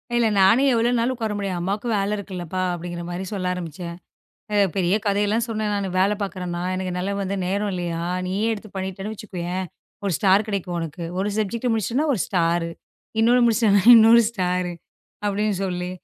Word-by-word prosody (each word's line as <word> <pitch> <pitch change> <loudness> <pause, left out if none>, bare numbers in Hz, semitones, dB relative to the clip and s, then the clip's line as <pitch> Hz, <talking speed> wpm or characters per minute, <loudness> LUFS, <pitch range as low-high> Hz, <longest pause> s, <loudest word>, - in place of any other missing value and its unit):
இல்ல, 235 -1 +3
"நானே 220 +8 +5
எவ்வளவு 235 +1 +2
நாள் 240 +3 +1
உக்கார 225 -4 -3
முடியும்? 195 -3 -2
அம்மாக்கும் 205 +6 -2
வேல 200 +2 0
இருக்குல்லப்பா" 185 -2 -5
அப்படிங்குற 175 0 -5
மாதிரி 180 +2 -4
சொல்ல 190 -3 -3
ஆரம்பிச்சேன். 170 0 -6 0.6
அ 210 - +1 0.2
பெரிய 185 0 +2
கதையெல்லாம் 205 +3 +1
சொன்னேன் 215 -2 -1
நானு. 200 -1 -1
"வேலை 200 +2 +3
பாக்குறேன்னா, 180 -3 -4
அதனால 185 +1 -2
வந்து 195 +1 -2
நேரம் 200 +2 -1
இல்லையா? 170 -2 -3 0.2
நீயே 195 +4 -1
எடுத்துப் 215 -2 -8
பண்ணிட்டேன்னு 190 +2 -4
வச்சுக்கோயேன். 185 -3 -4 0.4
1 195 - 0
ஸ்டார் 195 +1 +4
கெடைக்கும் 185 -3 -2
உனக்கு. 165 +1 -5
1 200 +2 0
சப்ஜக்ட் 230 +4 -1
முடிச்சிட்டா 240 - 0
1 210 - -3
ஸ்டாரு. 170 -2 +1 0.5
இண்ணொன்னு 240 +2 +5
முடிச்சிட்டான்னா 220 -4 +3
இன்னொரு 230 +1 +8
ஸ்டாரு" 180 -4 -1 0.5
அப்படின்னு 205 0 0
சொல்லி 180 -1 -3
195 Hz, 160 wpm, -23 LUFS, 180-215 Hz, 0.6 s, இன்னொரு